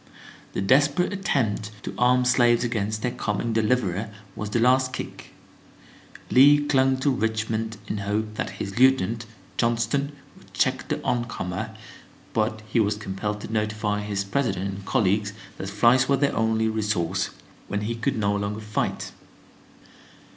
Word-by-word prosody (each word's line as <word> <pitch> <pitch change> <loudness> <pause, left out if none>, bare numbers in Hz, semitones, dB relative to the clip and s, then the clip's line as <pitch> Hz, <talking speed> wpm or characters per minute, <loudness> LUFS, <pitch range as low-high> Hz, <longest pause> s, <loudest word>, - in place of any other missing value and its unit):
The - - -1
desperate 145 - +3
attempt 115 - 0
to - - -5
arm 125 +1 +4
the 125 - +2
slaves 120 -2 +4
against 110 -3 -2
their 125 - +1
coming 115 +1 -2
deliverer 110 -3 +1 0.3
was 105 - -4
the 105 - 0
"last 130 +2 +3
kick." - - -7 1.0
Lee 145 +3 +7
clung 135 -2 +3
to 140 - +3
Richmond 110 -2 -1
in 105 - -3
hope 105 +2 -2
that - - -3
his 100 +3 -4
lieutenant, 120 -3 +3 0.3
Johnston, 125 +5 +1 0.2
would - - -19
check - - +1
the - - -1
oncomer, 110 -3 -2 0.6
but 110 -1 0
he 110 - +1
was 105 -1 +2
compelled 105 0 -4
to 110 - -7
notify 105 -1 -1
his 100 -1 -2
President 100 -3 -1
and 95 0 -8
colleagues 105 0 +1 0.3
that 95 - -4
flight 120 +6 +4
was 140 - +4
their 140 0 +1
only 110 0 +2
resource 105 -5 0 0.4
when 105 - -2
he 110 +3 -2
could 115 0 -1
no 100 -1 +1
longer 100 +1 -3
fight. 105 0 -2
110 Hz, 150 wpm, -25 LUFS, 105-125 Hz, 1.0 s, Lee